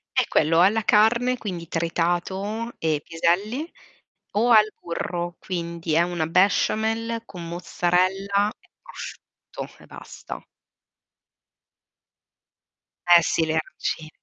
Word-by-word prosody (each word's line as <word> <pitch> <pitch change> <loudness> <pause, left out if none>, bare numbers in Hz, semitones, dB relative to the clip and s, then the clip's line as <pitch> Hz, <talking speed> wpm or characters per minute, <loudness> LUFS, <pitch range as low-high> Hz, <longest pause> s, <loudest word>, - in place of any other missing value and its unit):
È - - +4
quello. 165 +2 +3
Alla 210 +5 +4
carne, 235 +5 +3
quindi 175 -7 -6
tritato 175 +7 -1
e 155 -2 0
piselli, 205 - 0 0.6
o 230 +4 +2
al 215 -2 +6
burro, 175 0 -4
quindi 170 -3 -3
è 165 - +5
una 175 -2 -1
besciamella 220 +6 +1
con 175 -6 -9
mozzarella 185 +4 +1
e - - -29
prosciutto, - - -10
e - - -15
basta. - - -9 2.7
Eh, - - +8
sì 160 - +1
le 155 - -1
aranci 155 0 -3
180 Hz, 105 wpm, -24 LUFS, 170-215 Hz, 2.7 s, Eh